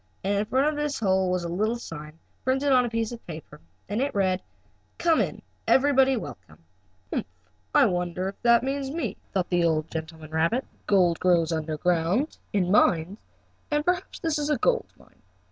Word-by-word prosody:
And 200 Hz, +2 st, +1 dB
in 210 Hz, -, 0 dB
front 260 Hz, +6 st, +2 dB
of 305 Hz, -, 0 dB
this 295 Hz, -1 st, -2 dB
hole 190 Hz, -3 st, +2 dB
was 180 Hz, -1 st, 0 dB
a -, -, -3 dB
little 210 Hz, +7 st, 0 dB
sign, 155 Hz, -7 st, -9 dB, 0.3 s
printed 270 Hz, +2 st, +1 dB
on 250 Hz, -1 st, +5 dB
a -, -, -2 dB
piece 230 Hz, 0 st, -1 dB
of 235 Hz, -1 st, -8 dB
paper, 155 Hz, -, -9 dB, 0.3 s
and 210 Hz, +5 st, -1 dB
it 280 Hz, -3 st, -1 dB
read: 190 Hz, -2 st, +1 dB, 0.6 s
"COME 330 Hz, -2 st, +3 dB
IN! -, -, -3 dB, 0.3 s
EVERYBODY 265 Hz, -1 st, +4 dB
WELCOME." 95 Hz, -, -9 dB, 0.6 s
"Humph! -, -, -1 dB, 0.5 s
I -, -, +7 dB
wonder 180 Hz, 0 st, -1 dB
if 195 Hz, -, -7 dB
that 235 Hz, 0 st, +5 dB
means 270 Hz, 0 st, -2 dB
me?" 320 Hz, +4 st, -3 dB
thought 185 Hz, -3 st, -1 dB
the 175 Hz, -1 st, +3 dB
old 160 Hz, -1 st, +1 dB
gentleman 160 Hz, -1 st, -6 dB
rabbit. 165 Hz, +11 st, +1 dB
"Let's -, -, -32 dB
see, -, -, -32 dB
gold 180 Hz, -4 st, +3 dB
grows 170 Hz, -3 st, +3 dB
under 160 Hz, -1 st, -2 dB
ground, 180 Hz, -, +1 dB
in 185 Hz, -3 st, +1 dB
mines, 185 Hz, 0 st, +3 dB, 0.5 s
and 295 Hz, 0 st, 0 dB
perhaps 360 Hz, +1 st, -1 dB
this 320 Hz, -3 st, -1 dB
is 295 Hz, 0 st, -1 dB
a 300 Hz, -, +2 dB
gold 475 Hz, -, +1 dB
mine. -, -, -23 dB
200 Hz, 195 wpm, -26 LUFS, 170-265 Hz, 0.6 s, I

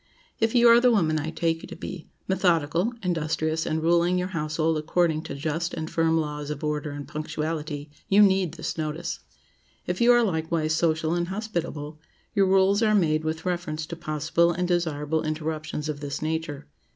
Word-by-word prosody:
If 225 Hz, +2 st, +1 dB
you 240 Hz, 0 st, +6 dB
are 235 Hz, 0 st, +8 dB
the 250 Hz, +1 st, +5 dB
woman 160 Hz, -9 st, +2 dB
I 155 Hz, +2 st, -3 dB
take 165 Hz, 0 st, -1 dB
you -, -, -9 dB
to -, -, -8 dB
be—methodical, 175 Hz, +1 st, -1 dB
industrious, 160 Hz, -2 st, -1 dB
and 160 Hz, 0 st, -1 dB
ruling 170 Hz, +2 st, +3 dB
your 180 Hz, +1 st, -1 dB
household 155 Hz, -1 st, 0 dB
according 160 Hz, 0 st, +1 dB
to 140 Hz, -, -5 dB
just 160 Hz, +4 st, -2 dB
and 160 Hz, 0 st, -5 dB
firm 165 Hz, 0 st, +2 dB
laws 150 Hz, -1 st, -4 dB
of 150 Hz, -1 st, -5 dB
order 150 Hz, 0 st, -1 dB
and 145 Hz, 0 st, -7 dB
punctuality, 155 Hz, -1 st, -4 dB, 0.2 s
you 205 Hz, +2 st, +7 dB
need 190 Hz, -4 st, +2 dB
this 160 Hz, 0 st, -4 dB
notice. 155 Hz, +1 st, -3 dB, 0.7 s
If -, -, -2 dB
you 240 Hz, +1 st, +7 dB
are 240 Hz, 0 st, +5 dB
likewise 160 Hz, -4 st, 0 dB
social 160 Hz, -1 st, +1 dB
and 175 Hz, 0 st, 0 dB
hospitable, 170 Hz, -7 st, -4 dB, 0.3 s
your 195 Hz, -2 st, +3 dB
rules 195 Hz, +2 st, +4 dB
are 215 Hz, -2 st, +4 dB
made 155 Hz, -5 st, +2 dB
with 160 Hz, +2 st, -3 dB
reference 170 Hz, -4 st, -2 dB
to 170 Hz, -, -6 dB
possible 160 Hz, +2 st, +1 dB
and 180 Hz, +1 st, -1 dB
desirable 160 Hz, -3 st, 0 dB
interruptions 155 Hz, -1 st, -3 dB
of 150 Hz, -2 st, -3 dB
this 145 Hz, -1 st, -4 dB
nature. 155 Hz, -2 st, -3 dB
160 Hz, 175 wpm, -26 LUFS, 155-180 Hz, 0.7 s, are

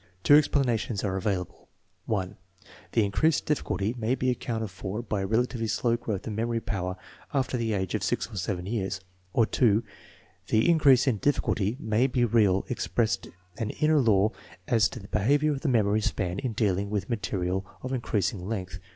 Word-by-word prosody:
Two -, -, +6 dB
explanations 125 Hz, -8 st, +2 dB
are 95 Hz, -2 st, -1 dB
available: 95 Hz, -3 st, -3 dB, 0.4 s
(1) 95 Hz, -4 st, -1 dB, 0.6 s
The 115 Hz, -3 st, +3 dB
increased 105 Hz, +11 st, +1 dB
difficulty 115 Hz, -7 st, -1 dB
may 120 Hz, +1 st, 0 dB
be 130 Hz, 0 st, +1 dB
accounted 115 Hz, -3 st, -3 dB
for 100 Hz, +4 st, -5 dB
by 105 Hz, -3 st, -2 dB
a 95 Hz, -, -2 dB
relatively 115 Hz, +1 st, 0 dB
slow 115 Hz, +2 st, +1 dB
growth 110 Hz, -4 st, -4 dB
of 110 Hz, -, -4 dB
memory 115 Hz, +2 st, -1 dB
power 95 Hz, -4 st, -3 dB, 0.4 s
after 130 Hz, -1 st, 0 dB
the 115 Hz, -2 st, -1 dB
age 95 Hz, -2 st, -2 dB
of -, -, -1 dB
6 -, -, -1 dB
or -, -, -9 dB
7 90 Hz, -1 st, -2 dB
years; 100 Hz, -2 st, -2 dB, 0.3 s
or 115 Hz, +3 st, +3 dB
(2) 110 Hz, 0 st, +2 dB, 0.6 s
the 110 Hz, +1 st, +3 dB
increase 145 Hz, -7 st, +5 dB
in 130 Hz, -6 st, +2 dB
difficulty 110 Hz, -3 st, 0 dB
may 110 Hz, +2 st, +2 dB
be 125 Hz, -2 st, +1 dB
real, 105 Hz, -4 st, +3 dB
expressing 110 Hz, -5 st, -1 dB, 0.3 s
an 110 Hz, -, -1 dB
inner 155 Hz, +4 st, +2 dB
law 110 Hz, -4 st, +3 dB, 0.4 s
as 115 Hz, -4 st, +3 dB
to 125 Hz, -, -8 dB
the 100 Hz, -, -11 dB
behavior 140 Hz, +10 st, +2 dB
of 140 Hz, -2 st, -3 dB
the 155 Hz, -, 0 dB
memory 110 Hz, -3 st, +2 dB
span 95 Hz, -3 st, -1 dB
in 130 Hz, -4 st, -2 dB
dealing 100 Hz, -2 st, 0 dB
with 100 Hz, -2 st, -2 dB
material 95 Hz, -4 st, -2 dB, 0.2 s
of 130 Hz, +1 st, -3 dB
increasing 105 Hz, -6 st, -1 dB
length. 95 Hz, -5 st, -4 dB
110 Hz, 175 wpm, -27 LUFS, 100-120 Hz, 0.6 s, Two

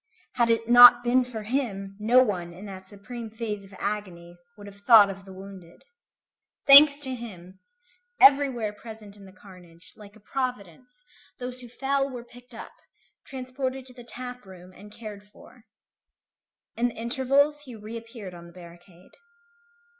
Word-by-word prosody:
Had 235 Hz, -2 st, +1 dB
it 230 Hz, 0 st, 0 dB
not 245 Hz, 0 st, +8 dB
been 250 Hz, +1 st, +2 dB
for 235 Hz, -3 st, -8 dB
him, 205 Hz, -5 st, -4 dB
no 240 Hz, +4 st, +4 dB
one, 180 Hz, -7 st, -4 dB
in 185 Hz, +4 st, -12 dB
that 190 Hz, -1 st, -11 dB
supreme 225 Hz, +3 st, -9 dB
phase 215 Hz, -2 st, -6 dB
of 195 Hz, 0 st, -15 dB
agony, 185 Hz, -5 st, -6 dB, 0.2 s
would 205 Hz, -, -12 dB
have 200 Hz, 0 st, -13 dB
thought 205 Hz, -2 st, +6 dB
of 195 Hz, 0 st, -12 dB
the 190 Hz, -, -13 dB
wounded. 190 Hz, -2 st, -13 dB, 0.8 s
Thanks 285 Hz, +1 st, +8 dB
to 260 Hz, -2 st, -2 dB
him, 190 Hz, -6 st, -11 dB, 0.6 s
everywhere 270 Hz, -6 st, +4 dB
present 215 Hz, -1 st, -12 dB
in 200 Hz, -1 st, -15 dB
the 190 Hz, -, -15 dB
carnage, 180 Hz, -3 st, -17 dB
like 205 Hz, 0 st, -15 dB
a -, -, -18 dB
providence, 250 Hz, -, -7 dB, 0.3 s
those 250 Hz, 0 st, -7 dB
who 245 Hz, -, -11 dB
fell 275 Hz, +2 st, -2 dB
were 245 Hz, -3 st, -8 dB
picked 245 Hz, +1 st, -17 dB
up, -, -, -10 dB, 0.6 s
transported 260 Hz, 0 st, -6 dB
to 255 Hz, -, -13 dB
the 245 Hz, -1 st, -13 dB
tap 250 Hz, +1 st, -9 dB
room, 185 Hz, -1 st, -15 dB
and 205 Hz, +2 st, -15 dB
cared 210 Hz, -2 st, -10 dB
for. 220 Hz, +3 st, -20 dB, 1.1 s
In 240 Hz, +1 st, 0 dB
the 240 Hz, -, -8 dB
intervals, 275 Hz, +5 st, 0 dB
he 250 Hz, -3 st, -11 dB
reappeared 225 Hz, -2 st, -10 dB
on 170 Hz, 0 st, -12 dB
the 170 Hz, -, -17 dB
barricade. 175 Hz, 0 st, -16 dB
225 Hz, 160 wpm, -25 LUFS, 195-250 Hz, 1.1 s, not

